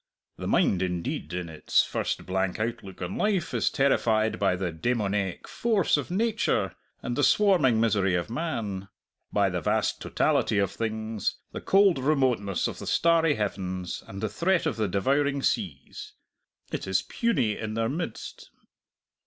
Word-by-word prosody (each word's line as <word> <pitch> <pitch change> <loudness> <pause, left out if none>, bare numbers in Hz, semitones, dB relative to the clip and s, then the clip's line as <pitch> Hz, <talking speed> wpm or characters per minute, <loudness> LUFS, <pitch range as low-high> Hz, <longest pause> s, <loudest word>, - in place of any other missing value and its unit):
The - - -5
mind, 95 - +2
indeed, 90 -2 -3
in 90 -1 -3
its 80 -2 +2
first - - -3
blank 95 0 -1
outlook 110 -5 -4
on 90 +2 -4
life 200 -5 0
is - - +2
terrified 110 -7 +2
by 95 -2 +2
the 90 -1 -2
demoniac 100 0 -1
force 220 -6 +1
of 145 - -3
nature 220 +4 0 0.3
and 120 - -2
the 145 - +1
swarming 150 - +4
misery 100 -5 +2
of 85 - -1
man; 110 - -3 0.4
by 100 -2 +2
the 90 -1 -2
vast - - 0
totality 105 - +1
of 100 -2 +1
things, 110 -1 -2 0.2
the - - -6
cold 195 -5 +4
remoteness 130 - +1
of - - -6
the - - -7
starry 165 -2 +3
heavens, 95 -3 -3
and 95 +1 -7
the - - +2
threat 170 - +1
of 160 - 0
the 110 -2 0
devouring 135 +8 +1
seas. 85 - -3 0.6
It - - -4
is 95 -2 +1
puny 125 - 0
in 110 -1 -5
their 115 0 +1
midst." 145 -2 -5
110 Hz, 155 wpm, -27 LUFS, 95-145 Hz, 0.6 s, swarming